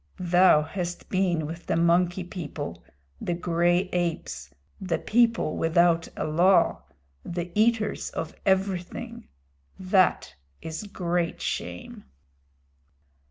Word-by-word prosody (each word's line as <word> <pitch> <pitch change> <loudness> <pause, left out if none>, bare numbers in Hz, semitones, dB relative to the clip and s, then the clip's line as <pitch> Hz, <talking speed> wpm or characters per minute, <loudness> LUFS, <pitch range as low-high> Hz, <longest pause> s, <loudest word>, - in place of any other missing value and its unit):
"Thou 175 -3 +4
hast 175 +2 -5
been 180 -4 +1
with 165 +3 -8
the - - +1
Monkey 175 +2 +2
People 150 - -7 0.4
the 175 - -1
gray 175 0 +2
apes 175 -2 -2 0.3
the 185 -3 -1
people 230 -7 +2
without 165 0 +3
a - - -2
law 175 +5 +3 0.4
the 175 0 -5
eaters 220 0 +1
of 160 - -5
everything. 190 +4 -1 0.5
That 185 0 +2 0.3
is 160 +5 -6
great 175 -3 -2
shame." - - -5
175 Hz, 105 wpm, -26 LUFS, 170-190 Hz, 0.5 s, Thou